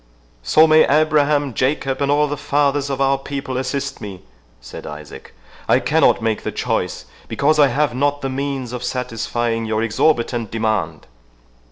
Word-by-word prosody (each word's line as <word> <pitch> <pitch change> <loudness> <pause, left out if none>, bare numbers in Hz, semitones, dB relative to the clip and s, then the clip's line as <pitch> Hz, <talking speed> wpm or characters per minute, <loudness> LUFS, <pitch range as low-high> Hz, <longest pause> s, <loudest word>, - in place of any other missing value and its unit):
"So 155 - +5
may 155 0 +5
Abraham, 145 -2 +2
Jacob, 135 +1 -1
and 140 - +1
all 150 +1 +3
the 145 - -3
fathers 140 0 0
of 135 -1 -3
our 135 0 +2
people 140 -1 -5
assist 135 +2 -3
me," 95 -3 -8 0.4
said - - -10
Isaac, 75 -1 -10 0.4
"I - - +5
cannot 120 - +2
make 110 -1 0
the - - -4
choice, - - -2 0.2
because 155 +2 +1
I 145 - +7
have 135 0 0
not 145 +2 0
the 135 - -2
means 135 -2 -4
of 125 0 -5
satisfying 120 -2 -2
your 110 0 -1
exorbitant 115 -1 0
demand!" 110 -9 -2
135 Hz, 160 wpm, -19 LUFS, 115-145 Hz, 0.4 s, I